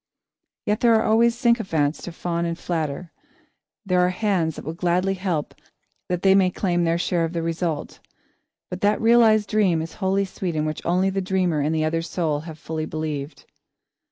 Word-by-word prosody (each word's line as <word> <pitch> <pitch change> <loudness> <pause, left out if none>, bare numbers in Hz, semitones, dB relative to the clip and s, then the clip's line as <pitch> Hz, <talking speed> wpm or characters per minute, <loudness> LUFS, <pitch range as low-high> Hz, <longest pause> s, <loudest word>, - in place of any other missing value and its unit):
There 225 +2 +3
are 220 - +3
always 230 +2 +3
sycophants 195 - +1
to 175 - -6
fawn 170 0 -3
and 170 0 -2
flatter, 165 -1 -3 0.7
there 180 -2 +2
are 180 0 +4
hands 180 -4 0
that - - -9
will 160 - -4
gladly 180 +3 0
help 180 -6 -2 0.6
that 180 0 -2
they 190 -1 +6
may 190 -1 +4
claim 175 -2 0
their 165 0 +1
share 170 0 0
of 165 +1 -2
the 165 -1 -2
result, 165 -2 -3 0.7
but 180 - -5
that 205 +1 +2
realised 225 -2 +4
dream 195 -6 +2
is 160 0 -5
wholly 195 +1 +1
sweet 185 -3 -4
in 155 0 0
which 155 0 -4
only 185 +3 +2
the 195 0 -1
dreamer 185 -4 0
and 150 +3 0
the 155 0 +1
other 165 +1 0
soul 165 -3 -1
have 160 0 -9
fully 155 0 -4
believed. 155 -2 -5
175 Hz, 185 wpm, -23 LUFS, 160-195 Hz, 0.7 s, they